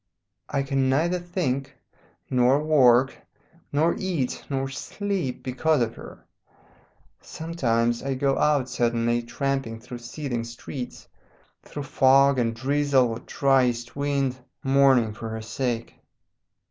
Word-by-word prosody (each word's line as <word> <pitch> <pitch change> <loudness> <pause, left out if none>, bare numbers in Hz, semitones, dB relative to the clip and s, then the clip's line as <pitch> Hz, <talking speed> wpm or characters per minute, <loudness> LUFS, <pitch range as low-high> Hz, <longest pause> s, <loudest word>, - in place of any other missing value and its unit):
I 140 - 0
can 135 -1 0
neither 170 +7 +1
think 140 -7 -3 0.5
nor 125 +2 +3
work 135 -4 +4 0.6
nor 155 +4 +2
eat 175 - -2
nor 135 -1 -1
sleep 185 0 -4
because 130 +2 +1
of 115 0 -3
her. - - -12 1.0
Sometimes 120 -8 -1
I 135 0 -2
go 135 +1 +1
out 145 -4 +2
suddenly, 120 -1 0
tramping 120 -1 -3
through 120 +1 -9
seething 120 0 -4
streets, 120 +2 -8 0.5
through 145 - -7
fog 135 0 +4
and 115 -1 0
drizzle 135 0 +2
or 115 0 -4
dry 135 -1 +2
east 120 0 -4
wind, 140 -2 -1 0.2
mourning 135 -5 +4
for 110 +1 -7
her 110 0 -5
sake. 115 0 -3
135 Hz, 120 wpm, -25 LUFS, 120-140 Hz, 1.0 s, work